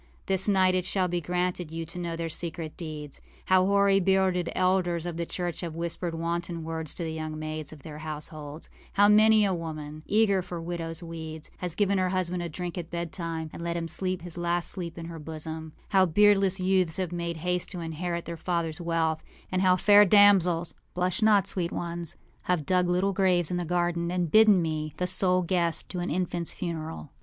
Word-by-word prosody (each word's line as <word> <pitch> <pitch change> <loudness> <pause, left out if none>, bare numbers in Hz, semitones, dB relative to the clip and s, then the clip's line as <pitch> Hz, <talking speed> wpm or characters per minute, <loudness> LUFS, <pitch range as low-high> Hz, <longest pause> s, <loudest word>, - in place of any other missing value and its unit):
This 190 0 +1
night 190 -2 +4
it 185 -1 0
shall 185 -2 +1
be 175 0 -2
granted 180 0 -2
you 165 +1 -5
to 180 - -8
know 170 -1 -3
their 165 0 -3
secret 165 -1 -5
deeds: 150 -4 -7 0.2
how 185 0 +4
hoary 200 0 +4
bearded 190 -2 +2
elders 185 -2 +1
of 175 -2 -4
the 170 0 -3
church 175 -3 -4
have 170 -3 -5
whispered 170 0 -3
wanton 170 0 -3
words 160 -1 -4
to 175 - -4
the 160 -1 -3
young 155 -1 -5
maids 155 -1 -5
of 150 -3 -13
their 150 -1 -8
households; 155 0 -6 0.3
how 205 +1 +5
many 215 0 +6
a 195 - +1
woman, 155 -3 -6
eager 205 -3 +3
for 175 -1 -6
widowsâ 165 0 -4
weeds, 160 -2 -7
has 180 -2 -4
given 200 -2 +2
her 185 0 +1
husband 180 -1 -1
a 170 - -4
drink 175 +2 -5
at 170 -1 -7
bedtime 165 -2 -4
and - - -8
let 170 0 -2
him 165 -1 -3
sleep 185 0 -2
his 175 -1 -7
last 175 0 +2
sleep 175 -3 -6
in 165 - -6
her 165 -1 -7
bosom; 160 0 -6 0.2
how 190 -2 +4
beardless 195 +1 +4
youths 185 -3 +1
have 185 -3 -2
made 170 -1 -3
haste 180 +2 -1
to 180 - -5
inherit 170 +1 -4
their 170 0 -6
fathersâ 170 -2 -2
wealth; 165 -2 0 0.3
and 185 0 +1
how 185 -1 +5
fair 205 +3 +7
damselsâblush 180 -2 +3
not, 210 -3 +5
sweet 175 -3 0
onesâhave 170 -1 -4
dug 180 +1 +2
little 185 +3 +1
graves 185 -3 +2
in 180 - 0
the 175 - -1
garden, 175 0 0
and 175 -3 -1
bidden 215 -5 +6
me, 155 -1 -3
the 180 - 0
sole 185 0 +4
guest 170 -2 0
to 180 - -4
an 175 - -2
infantâs 175 0 -2
funeral. 160 -4 -5
175 Hz, 200 wpm, -27 LUFS, 165-185 Hz, 0.3 s, fair